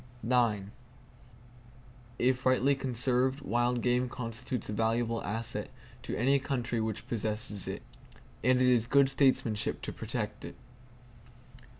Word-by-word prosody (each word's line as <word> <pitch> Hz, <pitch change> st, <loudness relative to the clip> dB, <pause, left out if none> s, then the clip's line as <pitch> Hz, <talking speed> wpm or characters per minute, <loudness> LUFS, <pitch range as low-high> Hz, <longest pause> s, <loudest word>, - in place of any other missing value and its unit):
If 130 Hz, +1 st, +1 dB
rightly 130 Hz, +2 st, +3 dB
conserved, 130 Hz, +1 st, +1 dB
wild 120 Hz, -1 st, 0 dB
game 125 Hz, 0 st, +2 dB
constitutes 120 Hz, 0 st, -4 dB
a 105 Hz, -, -4 dB
valuable 115 Hz, +1 st, 0 dB
asset 110 Hz, +1 st, -3 dB, 0.3 s
to 125 Hz, -, -4 dB
any 135 Hz, +5 st, +3 dB
country 120 Hz, -4 st, -2 dB
which 110 Hz, -1 st, -4 dB
possesses 110 Hz, -2 st, -1 dB
it; -, -, -5 dB, 0.6 s
and 125 Hz, +1 st, +4 dB
it 130 Hz, -, +4 dB
is 120 Hz, -2 st, +3 dB
good 140 Hz, +1 st, +4 dB
statesmanship 130 Hz, -6 st, +1 dB
to -, -, -4 dB
protect -, -, -4 dB
it. -, -, -8 dB
120 Hz, 115 wpm, -30 LUFS, 115-130 Hz, 0.6 s, and